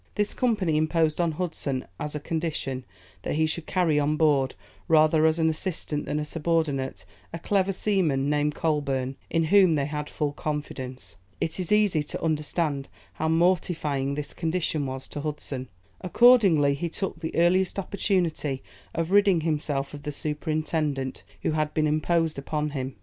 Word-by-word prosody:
This 210 -1 0
company 210 - +1
imposed 155 +1 +2
on 170 -2 +1
Hudson 150 -6 -3
as 150 0 -4
a - - -2
condition, 150 -5 -3 0.4
that - - -2
he 160 +1 +3
should 160 +1 -3
carry 170 -5 +2
on 150 +1 +1
board, 145 -4 +2 0.3
rather 155 -1 +5
as 160 +1 +2
an 160 -1 +2
assistant 160 -2 -3
than 150 - -1
as 150 - -3
a - - -11
subordinate, 150 - -1 0.3
a 165 - -4
clever 195 +2 +1
seaman, 180 -9 +1
named 150 0 +1
Coleburne, 135 -4 -1
in 165 0 +1
whom 190 -5 +6
they 140 -2 +1
had 150 0 -4
full 150 -1 -1
confidence. 130 -6 -5 0.2
It 160 - -2
is 180 0 -3
easy 210 -7 +4
to 150 - -6
understand 150 -2 -1 0.2
how 160 - -2
mortifying 160 -5 +1
this 145 -1 -4
condition 160 -4 -1
was 130 0 -5
to 145 - -5
Hudson. 145 -4 -4 0.3
Accordingly, 185 - +5
he 170 +5 -3
took 175 0 -3
the 160 -1 -5
earliest 180 +3 +3
opportunity 175 -8 -1 0.3
of 165 +1 -1
ridding 200 -4 +5
himself 145 -3 -1
of 145 - -7
the 150 - -4
superintendent 150 -2 -2 0.2
who - - +1
had 155 -1 -1
been 155 - +2
imposed 155 0 +1
upon 150 +1 -2
him. 130 -2 -4
155 Hz, 165 wpm, -26 LUFS, 145-170 Hz, 0.4 s, whom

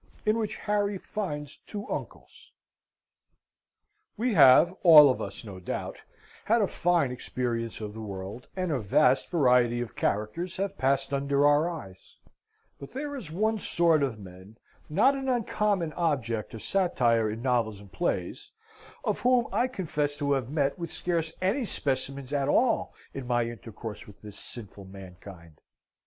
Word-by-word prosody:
In 215 +2 +2
which 215 -2 -2
Harry 205 -1 -1
finds 150 -8 -5
two 205 -1 -6
Uncles - - -8 1.7
We 240 +2 0
have 155 +2 +7
all 150 -5 +9
of - - -4
us, - - -6
no 95 -3 -8
doubt, 90 - -5 0.5
had 230 +2 +3
a 210 - +3
fine 170 -7 +1
experience 120 -2 -3
of 105 -1 -5
the 110 - -8
world, 100 +3 -7
and 185 -2 -2
a 140 - 0
vast 110 +8 +3
variety 125 -7 +3
of 120 -4 -5
characters 135 - -2
have 195 +1 -2
passed 135 +1 +1
under 140 +1 +1
our 145 +3 +4
eyes; 95 - -10 0.6
but 140 - -9
there 285 +2 -4
is 230 - -6
one 215 +6 0
sort 170 -5 +3
of 130 -5 -1
men 95 +2 -13 0.3
not 200 - +4
an 270 -1 -3
uncommon 210 -8 0
object 120 -11 -1
of 110 - -8
satire 120 - +2
in 110 +2 -5
novels 115 -5 0
and 100 -2 -15
plays 175 - -3 0.5
of - - -1
whom 250 -1 +3
I 250 - +2
confess 150 - -2
to 140 -1 -1
have 130 -4 0
met 145 +1 0
with 170 -1 -5
scarce 165 -2 -1
any 205 +9 +1
specimens 140 - -2
at 140 -1 0
all 235 - +2 0.2
in 135 -2 -6
my 120 -1 +2
intercourse 115 -1 -8
with 105 - -16
this 105 -1 -8
sinful 100 -4 -5
mankind. 95 -3 -13
140 Hz, 155 wpm, -28 LUFS, 115-180 Hz, 1.7 s, all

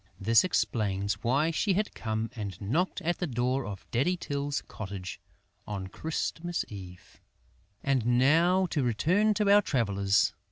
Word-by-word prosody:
This 115 +4 +5
explains 100 - 0
why 140 +7 +2
she 195 +5 +1
had 210 +3 -1
come 110 +1 -3
and 100 -5 -5
knocked 160 - -1
at 175 +1 -1
the 180 - -1
door 125 0 -1
of 100 -2 -7
Daddy 145 +10 +1
Tyl's 145 -3 -3
cottage 95 -3 -7 0.5
on 100 -2 -4
Christmas 165 - -3
Eve. 90 -3 -11 0.6
And 135 -3 +1
now 170 +8 +4
to 145 - +1
return 180 - +2
to 210 -1 +1
our 205 +1 +7
travellers. 100 - +1
130 Hz, 145 wpm, -29 LUFS, 105-170 Hz, 0.6 s, our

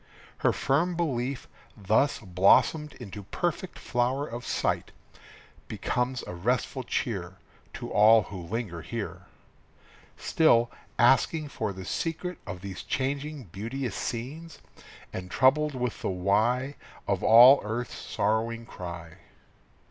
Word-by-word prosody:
Her - - +3
firm 165 +7 +1
belief, 135 -6 -2 0.3
thus 110 +8 +2
blossomed 105 - +3
into 100 +1 -8
perfect 175 - -3
flower 125 +3 0
of 120 -2 -7
sight, - - -1 0.8
Becomes 125 +1 -2
a - - -7
restful 125 +8 -1
cheer 95 -7 -3 0.4
To - - -6
all 110 +1 +6
who 95 -3 -8
linger 85 -2 -4
here, - - -6 0.9
Still 120 -7 +3 0.3
asking 140 +5 +3
for 110 -6 -3
the 95 -1 -8
secret 165 - -3
of 90 0 -6
these 95 -1 -6
changing, 140 +2 -3
beauteous 115 +4 -4
scenes, 145 +8 -5 0.6
And 90 0 -6
troubled 140 +6 +3
with 125 -2 -3
the - - -1
why 110 +9 +1 0.3
Of - - 0
all 125 +5 +9
earth's 110 +3 -3
sorrowing 115 +2 -1
cry. 85 -5 -8
120 Hz, 120 wpm, -28 LUFS, 100-140 Hz, 0.9 s, all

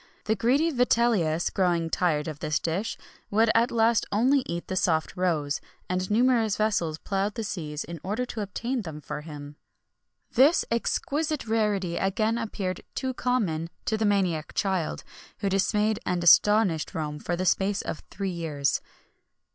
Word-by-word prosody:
The 220 - +1
greedy 275 +9 +2
Vitellius, 230 - +2
growing 175 -3 +1
tired 155 -4 +1
of 155 -2 -6
this 150 -1 0
dish, 175 +7 -2 0.3
would 220 +2 +3
at 235 +2 +3
last 230 -2 +2
only 250 +7 +3
eat 170 0 -4
the 185 - -3
soft 170 -4 +1
roes: 160 -6 0 0.3
and 185 0 -2
numerous 225 -1 +3
vessels 200 -8 0
ploughed 195 +3 -2
the 225 - -3
seas 155 -7 -4
in 170 -1 -8
order 215 +7 -2
to 230 -3 -5
obtain 235 +5 -3
them 160 -6 -7
for 150 - -6
him.[XXI 145 -2 -9 0.8
66] - - -15
This 285 +7 +5
exquisite 300 +5 -1
rarity 210 -6 0
again 215 +4 0
appeared 195 -5 -3
too 260 -1 -2
common 200 -11 -1 0.2
to 220 - +1
the 220 0 0
maniac 185 -7 0
child, 190 -5 -1 0.3
who 200 - -1
dismayed 210 +2 +1
and 180 -1 -1
astonished 195 -2 +4
Rome 150 -2 -3
for 175 - -2
the 185 +2 -2
space 195 +2 +1
of - - -5
three 195 -1 -3
years. 150 -5 -1
195 Hz, 160 wpm, -27 LUFS, 165-225 Hz, 0.8 s, This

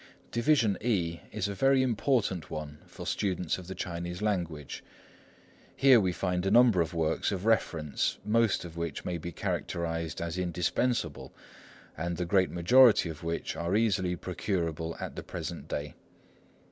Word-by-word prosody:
Division 120 -4 +2
E 90 -8 0
is - - -2
a 100 - -3
very 135 +5 +3
important 115 - 0
one 75 -1 -6
for - - -9
students 90 -4 -1
of 90 - -11
the 95 - -6
Chinese 85 +1 -4
language. 85 -9 -2 0.9
Here 135 -3 +6
we 95 -3 +1
find 90 0 -1
a 95 - +1
number 115 -4 +6
of 85 +1 -2
works 80 -1 0
of 100 0 -3
reference, 80 -10 +1
most 110 -3 +2
of 85 -1 -9
which 85 -3 -4
may 90 -2 -2
be 85 +2 -6
characterised 80 -1 -3
as 85 +1 -3
indispensable, 90 +8 -1 0.6
and 85 +1 -3
the 90 - -1
great 95 +1 +3
majority 110 +2 +5
of 75 -3 -8
which 85 0 -3
are 85 +3 -1
easily 95 -5 +1
procurable 85 -3 -3
at - - -6
the - - -5
present - - -6
day. 75 0 -4
90 Hz, 155 wpm, -29 LUFS, 85-105 Hz, 0.9 s, Here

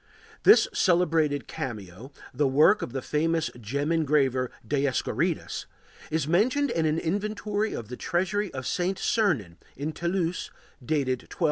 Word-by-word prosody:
This 420 +4 +7
celebrated 160 - +2
cameo, 110 0 -6 0.2
the 145 - +2
work 150 +10 +5
of - - -4
the 135 0 -4
famous 165 +1 0
gem 140 +8 -2
engraver 140 -6 +2 0.2
Dioskorides, 145 +3 -1 0.4
is 155 -2 -1
mentioned 250 - +2
in 165 -5 +1
an 155 +1 +1
inventory 210 +4 -1
of 115 -2 -7
the 125 - -6
treasury 190 +3 -1
of 130 -1 -6
St. 180 +1 -1
Sernin, 140 - 0 0.2
in 145 +4 -3
Toulouse, 170 +2 -2 0.3
dated 130 -2 0
1246. - - -13
155 Hz, 135 wpm, -27 LUFS, 135-180 Hz, 0.4 s, This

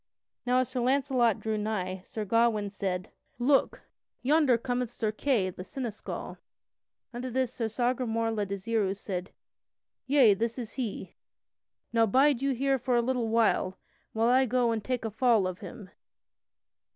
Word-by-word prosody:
Now 250 +1 +3
as 255 - -3
Sir 255 -1 -3
Launcelot 255 -3 +2
drew 220 -1 -2
nigh 190 -3 -3
Sir 215 +2 -5
Gawain 215 -1 +2
said: 185 -2 -3 0.3
"Look, 265 +3 +2 0.4
yonder 285 -2 +4
cometh 245 0 -2
Sir 220 -2 -2
Kay 215 -5 0
the 180 - -8
Seneschal." 235 -1 -6 0.7
Unto 245 +2 -4
this 255 0 -1
Sir 230 -3 -2
Sagramore 230 -1 0
le 215 -2 -1
Desirous 200 0 -1
said: 185 -2 -4 0.8
"Yea, 260 -6 +6
this 230 +4 -2
is 235 -4 -5
he; 240 -6 -5 0.8
now 230 -1 +4
bide 270 +4 +3
you 275 0 +1
here 270 +1 +1
for 250 0 0
a 240 - +4
little 250 -2 0
while, 220 -4 +1 0.4
and 220 - +1
I 245 +3 +5
will 265 - +1
go 245 0 +2
and 220 -2 -2
take 250 -3 -2
a 220 - -2
fall 225 -2 +3
of 185 -1 -4
him." 205 -6 -10
230 Hz, 160 wpm, -29 LUFS, 210-255 Hz, 0.8 s, Yea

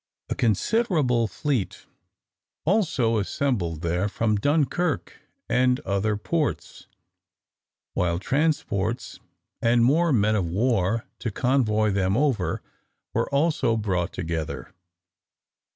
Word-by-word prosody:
A - - 0
considerable 125 - +1
fleet 105 - -2 0.8
also 150 - +2
assembled 100 - -1
there 90 +4 0
from 110 +1 0
Dunkirk 145 - 0 0.3
and 125 +1 +2
other 100 +2 0
ports, 155 +7 -3 1.1
while 85 -1 0
transports, 125 - -1 0.4
and 115 0 +4
more 160 +6 +3
men 110 -3 +3
of 90 -5 0
war 110 +1 +1
to 120 - -2
convoy 110 -3 +1
them 95 +1 +1
over, 130 -10 0 0.5
were - - 0
also 140 -5 +1
brought 95 -4 -1
together. 80 -6 -4
115 Hz, 100 wpm, -25 LUFS, 100-140 Hz, 1.1 s, and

